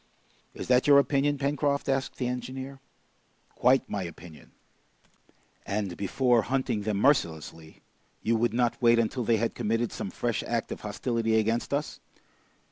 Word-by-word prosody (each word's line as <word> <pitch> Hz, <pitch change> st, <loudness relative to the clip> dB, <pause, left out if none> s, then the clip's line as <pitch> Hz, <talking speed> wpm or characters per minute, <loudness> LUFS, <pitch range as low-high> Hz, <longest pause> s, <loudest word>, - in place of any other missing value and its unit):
"Is -, -, -6 dB
that 125 Hz, +1 st, +3 dB
your 145 Hz, -1 st, +8 dB
opinion, 140 Hz, +1 st, +2 dB
Pencroft?" 140 Hz, 0 st, 0 dB
asked 135 Hz, -1 st, -1 dB
the 125 Hz, -, -2 dB
engineer. 130 Hz, +2 st, -5 dB, 0.7 s
"Quite 130 Hz, +1 st, +3 dB
my 100 Hz, -, -3 dB
opinion." 85 Hz, -2 st, -10 dB, 1.1 s
"And 100 Hz, -3 st, -3 dB
before 120 Hz, +4 st, +2 dB
hunting 130 Hz, -2 st, -1 dB
them 105 Hz, -1 st, -1 dB
mercilessly, 80 Hz, -, 0 dB, 0.4 s
you 115 Hz, -, +2 dB
would 115 Hz, 0 st, +1 dB
not 120 Hz, +1 st, 0 dB
wait 120 Hz, -1 st, +5 dB
until 115 Hz, +2 st, 0 dB
they 115 Hz, 0 st, +2 dB
had 115 Hz, +1 st, -1 dB
committed 115 Hz, +2 st, -1 dB
some -, -, -5 dB
fresh 120 Hz, +3 st, -2 dB
act 115 Hz, -1 st, -3 dB
of -, -, -6 dB
hostility 115 Hz, +1 st, -1 dB
against 115 Hz, +2 st, 0 dB
us?" 145 Hz, +2 st, -2 dB
120 Hz, 145 wpm, -28 LUFS, 105-135 Hz, 1.1 s, your